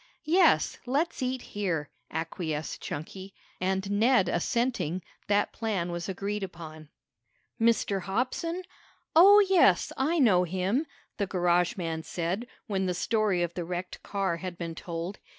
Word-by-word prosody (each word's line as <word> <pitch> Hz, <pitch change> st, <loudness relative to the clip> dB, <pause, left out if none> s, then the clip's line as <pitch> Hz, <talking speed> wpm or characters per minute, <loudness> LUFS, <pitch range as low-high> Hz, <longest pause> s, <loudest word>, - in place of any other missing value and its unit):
"Yes, 350 Hz, +5 st, +4 dB
let's 285 Hz, +6 st, 0 dB
eat 255 Hz, 0 st, -2 dB
here," 175 Hz, -8 st, -2 dB, 0.2 s
acquiesced 160 Hz, -1 st, -4 dB
Chunky, 190 Hz, +6 st, -7 dB, 0.2 s
and 190 Hz, +1 st, -1 dB
Ned 215 Hz, -1 st, +4 dB
assenting, 185 Hz, -6 st, 0 dB, 0.2 s
that 205 Hz, 0 st, +2 dB
plan 195 Hz, -6 st, -2 dB
was 175 Hz, +2 st, -4 dB
agreed 200 Hz, +2 st, -3 dB
upon. 160 Hz, -4 st, -8 dB, 0.7 s
"Mr. 220 Hz, -4 st, +2 dB
Hobson? 255 Hz, -, -2 dB, 0.5 s
Oh, 400 Hz, +5 st, +8 dB
yes, 380 Hz, -2 st, +4 dB
I 310 Hz, +6 st, +1 dB
know 205 Hz, -, +5 dB
him," 190 Hz, -, 0 dB, 0.3 s
the 200 Hz, -, -1 dB
garage 175 Hz, -1 st, +2 dB
man 165 Hz, -3 st, -3 dB
said 175 Hz, +8 st, -3 dB, 0.2 s
when 195 Hz, -4 st, -1 dB
the 180 Hz, -, -1 dB
story 210 Hz, -2 st, +1 dB
of 170 Hz, 0 st, -3 dB
the 175 Hz, -, -3 dB
wrecked 180 Hz, +1 st, -5 dB
car 195 Hz, -4 st, -1 dB
had 180 Hz, 0 st, -6 dB
been 170 Hz, -1 st, -4 dB
told. 170 Hz, +3 st, -5 dB
190 Hz, 135 wpm, -28 LUFS, 175-230 Hz, 0.7 s, Oh